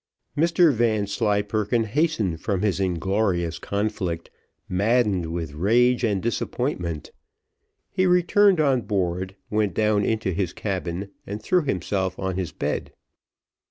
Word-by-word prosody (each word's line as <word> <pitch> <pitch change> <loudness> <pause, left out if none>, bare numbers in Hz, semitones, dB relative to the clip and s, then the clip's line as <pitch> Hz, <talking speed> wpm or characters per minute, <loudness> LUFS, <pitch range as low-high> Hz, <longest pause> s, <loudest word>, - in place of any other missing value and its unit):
Mr 170 0 +4
Vanslyperken 105 0 +1
hastened 110 - 0
from 100 -2 -1
his 100 -3 +1
inglorious 90 -2 0
conflict, 100 -4 -3 0.4
maddened 100 -2 +1
with 80 -3 -4
rage 120 +9 +3
and 100 -5 +1
disappointment. 100 - -2 0.8
He 185 -1 +2
returned 180 +1 +4
on 135 -5 +3
board, 95 -2 -2 0.2
went 105 -2 +1
down 105 -1 +2
into 110 -2 0
his 95 0 -2
cabin, 95 -1 -4 0.2
and 100 +2 -4
threw 180 +11 +2
himself 95 - -1
on 95 -1 -2
his 90 -4 -3
bed. - - -3
100 Hz, 120 wpm, -24 LUFS, 95-120 Hz, 0.8 s, Mr